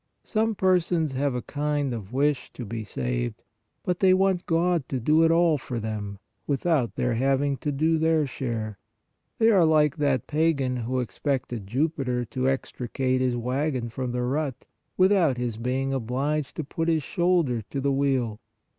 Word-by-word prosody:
72 -, -, -43 dB
PRAYER -, -, -14 dB
Some 220 Hz, 0 st, +1 dB, 0.2 s
persons 165 Hz, -3 st, -1 dB
have 135 Hz, 0 st, -1 dB
a 125 Hz, -, -2 dB
kind 145 Hz, -2 st, -1 dB
of 105 Hz, -4 st, -6 dB
wish 140 Hz, 0 st, 0 dB
to 120 Hz, -, -7 dB
be 110 Hz, +1 st, -5 dB
saved, -, -, -3 dB, 0.4 s
but 180 Hz, -1 st, -1 dB
they 185 Hz, -1 st, +5 dB
want 190 Hz, -1 st, +1 dB
God 165 Hz, -3 st, +1 dB
to 130 Hz, -, -1 dB
do 155 Hz, +7 st, +4 dB
it 165 Hz, -, +5 dB
all 165 Hz, -2 st, +3 dB
for 125 Hz, -2 st, -4 dB
them, 105 Hz, -2 st, -4 dB, 0.3 s
without 140 Hz, -3 st, +1 dB
their 125 Hz, -, 0 dB
having 135 Hz, +3 st, +1 dB
to 145 Hz, -, -2 dB
do 160 Hz, +3 st, +1 dB
their 160 Hz, -1 st, +3 dB
share; 115 Hz, -6 st, -4 dB, 0.6 s
they 225 Hz, 0 st, +5 dB
are 190 Hz, -5 st, +5 dB
like 155 Hz, -2 st, +3 dB
that 140 Hz, -5 st, +1 dB
pagan 145 Hz, -5 st, +1 dB
who 125 Hz, +2 st, -1 dB
expected 125 Hz, -3 st, -3 dB
Jupiter 130 Hz, -1 st, -1 dB
to 130 Hz, +3 st, -1 dB
extricate 130 Hz, 0 st, -1 dB
his 125 Hz, -1 st, +1 dB
wagon 125 Hz, +1 st, -1 dB
from 125 Hz, +2 st, -4 dB
the 125 Hz, 0 st, -1 dB
rut, 135 Hz, +1 st, -2 dB, 0.3 s
without 185 Hz, -8 st, +4 dB
his 120 Hz, -3 st, -3 dB
being 130 Hz, +3 st, -1 dB
obliged 135 Hz, +4 st, -1 dB
to 160 Hz, -, -3 dB
put 165 Hz, +3 st, -3 dB
his 160 Hz, -3 st, +2 dB
shoulder 170 Hz, -10 st, +1 dB
to 140 Hz, -, -3 dB
the 140 Hz, +1 st, +1 dB
wheel. 135 Hz, -6 st, 0 dB
135 Hz, 175 wpm, -26 LUFS, 125-155 Hz, 0.6 s, they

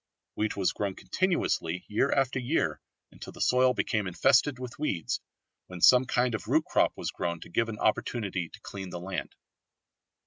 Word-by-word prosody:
Wheat 110 Hz, -1 st, -2 dB
was 95 Hz, -, +2 dB
grown 100 Hz, -2 st, -3 dB
continuously 90 Hz, -, -1 dB
year 110 Hz, +6 st, +1 dB
after 135 Hz, -1 st, +1 dB
year 120 Hz, -, 0 dB, 0.3 s
until -, -, -10 dB
the -, -, -13 dB
soil 125 Hz, 0 st, +3 dB
became 105 Hz, -4 st, 0 dB
infested 130 Hz, +9 st, +3 dB
with 125 Hz, 0 st, -8 dB
weeds, 100 Hz, -, -1 dB, 0.5 s
when 90 Hz, -1 st, -8 dB
some 125 Hz, +8 st, +7 dB
kind 125 Hz, -1 st, +1 dB
of 110 Hz, -, -4 dB
root -, -, +2 dB
crop -, -, +1 dB
was -, -, -3 dB
grown 85 Hz, -1 st, -3 dB
to -, -, -10 dB
give 115 Hz, +6 st, 0 dB
an 110 Hz, -, -5 dB
opportunity 100 Hz, -5 st, -1 dB
to -, -, -14 dB
clean 95 Hz, -2 st, -7 dB
the 90 Hz, -, -6 dB
land. 90 Hz, -1 st, -5 dB
110 Hz, 175 wpm, -29 LUFS, 90-125 Hz, 0.5 s, some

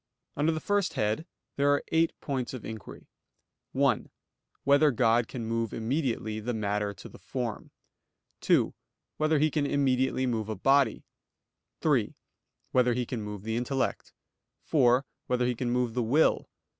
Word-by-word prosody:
Under 150 Hz, +3 st, +2 dB
the 160 Hz, -, -2 dB
first 205 Hz, +2 st, 0 dB
head 110 Hz, -, -1 dB, 0.3 s
there 140 Hz, 0 st, +3 dB
are 145 Hz, 0 st, +2 dB
eight 165 Hz, 0 st, +3 dB
points 130 Hz, -3 st, -3 dB
of 125 Hz, -, -8 dB
inquiry: 110 Hz, -2 st, -8 dB, 0.7 s
(1) -, -, +1 dB, 0.5 s
Whether 145 Hz, +2 st, +5 dB
God 120 Hz, -2 st, +3 dB
can 120 Hz, -4 st, -5 dB
move 115 Hz, -1 st, -2 dB
immediately 115 Hz, -3 st, -1 dB
the 120 Hz, +2 st, -3 dB
matter 105 Hz, -1 st, -1 dB
to 90 Hz, -, -10 dB
the -, -, -14 dB
form? 120 Hz, -4 st, -4 dB, 0.7 s
(2) -, -, +2 dB, 0.4 s
Whether 155 Hz, 0 st, +2 dB
He 155 Hz, +1 st, +2 dB
can 145 Hz, -1 st, 0 dB
immediately 130 Hz, -2 st, +1 dB
move 110 Hz, -4 st, -1 dB
a 110 Hz, -, -2 dB
body? 135 Hz, +7 st, +3 dB, 0.8 s
(3) -, -, +1 dB, 0.6 s
Whether 125 Hz, -1 st, +3 dB
He 125 Hz, 0 st, -1 dB
can 120 Hz, -1 st, -4 dB
move 105 Hz, -2 st, -6 dB
the 110 Hz, +1 st, -2 dB
intellect? 130 Hz, +3 st, -2 dB, 0.5 s
(4) 130 Hz, -3 st, +3 dB, 0.2 s
Whether 125 Hz, 0 st, +1 dB
He 125 Hz, -, +1 dB
can 120 Hz, +1 st, -3 dB
move 125 Hz, -1 st, 0 dB
the 125 Hz, -, 0 dB
will? 135 Hz, +8 st, +2 dB
125 Hz, 155 wpm, -29 LUFS, 115-140 Hz, 0.8 s, Whether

